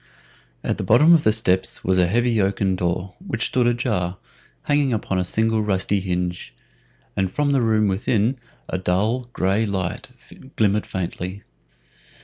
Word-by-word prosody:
At - - -2
the - - -1
bottom 155 +7 +6
of 160 -3 +4
the 110 - +4
steps 95 -4 0
was 95 0 +2
a 90 - +4
heavy 115 +2 +2
oaken 95 -1 +1
door, 90 +1 -2
which 120 - -2
stood 125 -2 +1
ajar, 110 -7 -1 0.5
hanging 145 -2 +1
upon 100 -4 -1
a - - +1
single 110 +4 0
rusty 100 -1 0
hinge, 90 -1 -3 0.6
and 95 -1 0
from 145 +6 0
the 135 -2 +2
room 110 -2 +2
within 110 +5 0 0.3
a 90 - -3
dull, 110 +8 0
gray 95 +1 +1
light 95 -3 -3 0.5
glimmered 105 -1 +1
faintly. 95 +1 -5
100 Hz, 150 wpm, -22 LUFS, 95-120 Hz, 0.6 s, bottom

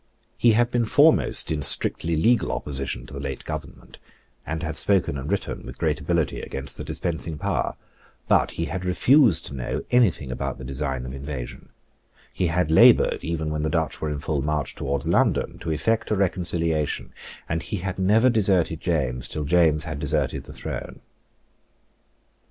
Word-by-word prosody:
He 120 -2 +4
had 120 +2 +2
been 120 -2 +1
foremost 110 - +3
in 75 -2 -1
strictly 80 +4 +4
legal 115 +8 +2
opposition 70 -3 -3
to 65 - -12
the 70 - -6
late 70 -1 -5
Government, - - -8 0.5
and 80 +2 -3
had 80 -2 -3
spoken 95 -7 +2
and 70 +1 -5
written - - -3
with - - -9
great - - 0
ability - - -1
against 70 -1 -5
the - - -6
dispensing 80 0 -4
power: - - -2 0.5
but - - +3
he 85 - -1
had 95 +1 -4
refused 100 - +4
to - - -7
know 65 -3 -4
any 120 -3 +5
thing 70 -6 -8
about - - -4
the 65 - -10
design 65 -1 -3
of 65 - -7
invasion: 70 -2 -7 0.6
he 90 - 0
had 80 -1 0
laboured, 80 - +5
even 80 -2 -2
when 75 0 -2
the 80 - -1
Dutch 80 -4 -2
were 75 - -1
in 75 - -3
full 75 -1 -2
march 75 -1 -2
towards 70 +1 -3
London, - - +1
to 80 - -5
effect 110 +8 0
a 105 - +1
reconciliation; 85 -5 -1 0.3
and 80 0 -2
he 105 +3 -4
had 95 +1 -4
never 105 +6 +4
deserted 95 -7 +1
James 65 -7 -1
till 75 +2 -4
James 80 0 +3
had 80 -1 -5
deserted 75 -2 -1
the - - -11
throne. - - -7
80 Hz, 175 wpm, -24 LUFS, 70-90 Hz, 0.6 s, any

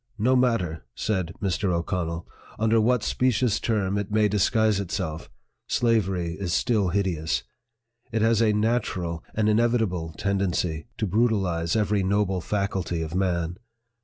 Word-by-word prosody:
"No 125 +5 +3
matter," 115 - +1
said 95 -5 -1
Mr. 95 0 0
O'CONNELL, 85 -1 -2 0.3
"under 110 +1 +3
what 120 0 +2
specious 125 -4 +1
term 100 -3 0
it 105 - -4
may 105 0 +3
disguise 105 +1 +2
itself, 95 -5 -4 0.4
slavery 95 -8 +1
is 90 -4 -2
still 105 -6 +2
hideous. 85 -4 0 0.7
It 110 -1 +1
has 115 0 +3
a 110 -2 +4
natural, 105 -6 -1
an 110 -1 +2
inevitable 105 -7 +1
tendency 90 -5 -1
'to 110 - 0
brutalize 95 -5 +1
every 105 -2 +2
noble 95 -1 +1
faculty 95 -4 -2
of 80 0 -6
man. 90 -2 0
100 Hz, 135 wpm, -25 LUFS, 90-110 Hz, 0.7 s, a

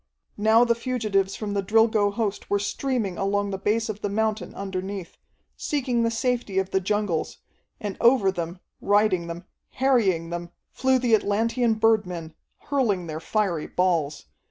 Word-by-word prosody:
Now 220 +3 +5
the 235 - +3
fugitives 220 -6 -1
from 210 -2 -4
the 200 - 0
Drilgo 215 0 +3
host 210 -1 -3
were 205 - +2
streaming 210 -1 -2
along 200 +1 0
the 195 - -4
base 220 +3 0
of 210 -1 -5
the 205 - -1
mountain 215 +1 -1
underneath, 190 -1 -5 0.4
seeking 255 -5 -1
the 230 - +2
safety 230 -3 -1
of 190 0 0
the 190 - +2
jungles, 200 -3 -1 0.4
and 205 -2 -5
over 235 -5 +5
them, 175 0 -5 0.2
riding 200 -4 +2
them, 170 +1 -7 0.3
harrying 200 -11 +2
them, 175 0 -4 0.2
flew 260 0 +2
the 245 -2 +1
Atlantean 225 +3 +2
birdmen, 185 -8 +1 0.3
hurling 225 -11 0
their 155 -1 -5
fiery 180 -3 -1
balls. 165 -6 0
205 Hz, 155 wpm, -25 LUFS, 190-225 Hz, 0.4 s, Now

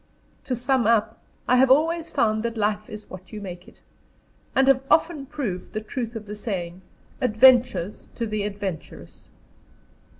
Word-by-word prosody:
To 255 - -1
sum 250 -1 +1
up, 225 -1 +2 0.3
I 250 - +4
have 260 +1 +5
always 325 +4 +3
found 215 -1 +1
that 230 0 -3
life 210 +1 -1
is 215 -1 -9
what 185 0 -11
you 215 - -6
make 180 -3 -8
it, - - -19 0.7
and 270 0 +4
have 270 -1 +5
often 315 -4 +2
proved 250 -12 -5
the 215 - -1
truth 230 +1 -5
of 220 -1 -6
the 210 0 -7
saying, 185 -4 -5 0.4
"Adventures 240 -5 +3
to 235 - -2
the 215 -1 -2
adventurous." 200 -4 -6
220 Hz, 160 wpm, -24 LUFS, 205-255 Hz, 0.7 s, have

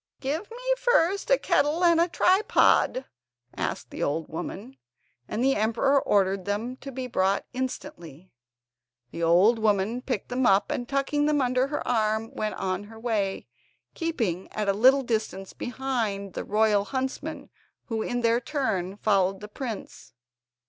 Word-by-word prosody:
"Give 310 +9 -3
me 465 - -9 0.2
first 400 -3 +2
a - - +5
kettle 310 -2 +1
and 335 -1 +5
a 340 - +3
tripod," 360 -7 +3 0.5
asked - - -4
the - - -7
old 155 +3 0
w 160 - -6
omen, 220 +8 -7 0.5
and 230 - -2
the 270 +1 +3
emperor 230 +6 +2
ordered 195 -2 +1
them 220 +5 -2
to 275 - -8
be 260 0 -5
brought 195 -5 0
instantly. 250 - -6 0.8
The 170 - -6
old 180 +8 +4
woman 215 +2 +1
picked 250 -6 -3
them 250 0 +1
up, 195 0 +3
and 245 -1 -3
tucking 285 +2 +1
them 300 -1 +2
under 255 0 +1
her 295 +1 -4
arm 220 -1 0
went 215 0 -3
on 185 +1 -3
her 220 +1 -12
way, 215 -5 -1 0.5
keeping 225 - -2
at 210 -1 -2
a 200 - +3
little 260 +6 +5
distance 215 -5 -3
behind 230 -7 -3
the - - -4
royal 210 -1 +2
huntsmen, 260 +3 -4 0.3
who 225 -2 -3
in 245 +2 -2
their 230 +1 +2
turn 220 - -2
followed 195 -2 +2
the 210 - -8
prince. 215 - -7
230 Hz, 155 wpm, -26 LUFS, 200-270 Hz, 0.8 s, a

